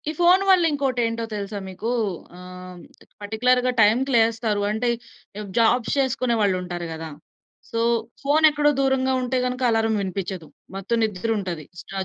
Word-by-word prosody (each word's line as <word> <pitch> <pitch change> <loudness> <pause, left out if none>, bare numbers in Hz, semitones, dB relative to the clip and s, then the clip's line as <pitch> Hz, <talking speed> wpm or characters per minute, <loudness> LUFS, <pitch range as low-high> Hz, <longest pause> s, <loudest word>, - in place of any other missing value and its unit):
ఈ - - 0
ఫోన్ 355 +2 +5
వల్ల 370 -2 +6
ఇంకోటేంటో 245 -5 -1
తెలుసా 205 0 -4
మీకు? 190 +5 -5 0.5
ఆహ్, 180 0 -10 0.4
పర్టిక్యులర్‌‌గా 250 +4 +1
టైమ్‌కి 240 +6 +3
లేస్తారు. 225 -2 +2
అంటే, 220 +4 -1 0.5
ఇప్ 210 -2 -7
జాబ్స్ 230 +1 +3
చేసుకునే 255 -3 +1
వాళ్ళు 200 -3 +2
ఉంటారు 175 -1 -5
గదా! 160 0 -6 0.6
సో 230 - -2 0.4
ఫోన్ 290 +3 +2
ఎక్కడో 295 0 +2
దూరంగా 265 -1 +1
ఉంటే 255 +1 -1
గనక 250 +1 -3
అల్లారం 225 -1 +1
వినిపిచ్చదు. 185 -3 -5 0.3
మొత్తం 195 +4 -2
నిద్ర 215 0 -2
ఉంటది. 175 -5 -5 0.2
స్ట్రా 195 - -7
225 Hz, 145 wpm, -23 LUFS, 195-255 Hz, 0.6 s, వల్ల